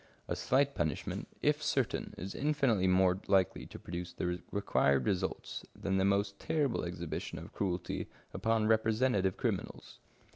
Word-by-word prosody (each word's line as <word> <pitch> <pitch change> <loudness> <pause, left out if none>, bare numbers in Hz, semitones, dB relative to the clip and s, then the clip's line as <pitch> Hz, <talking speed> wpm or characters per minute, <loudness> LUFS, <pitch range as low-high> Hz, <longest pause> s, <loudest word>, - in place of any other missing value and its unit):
A - - -1
slight 140 +2 +2
punishment, 80 - -2 0.2
if - - +3
certain, - - 0
is 95 +3 -5
infinitely 135 -10 +2
more 90 0 +4
likely 95 -3 +2
to - - -9
produce 85 0 -5
the 90 0 -2
required 70 -9 +2
results 95 -1 -2
than 95 -1 -1
the 95 - +3
most 100 0 +1
terrible 145 -6 0
exhibition 85 -2 -4
of - - -9
cruelty 90 -3 -2 0.3
upon 115 -1 +1
representative 110 -3 +2
criminals. - - -3
95 Hz, 140 wpm, -33 LUFS, 90-110 Hz, 0.3 s, more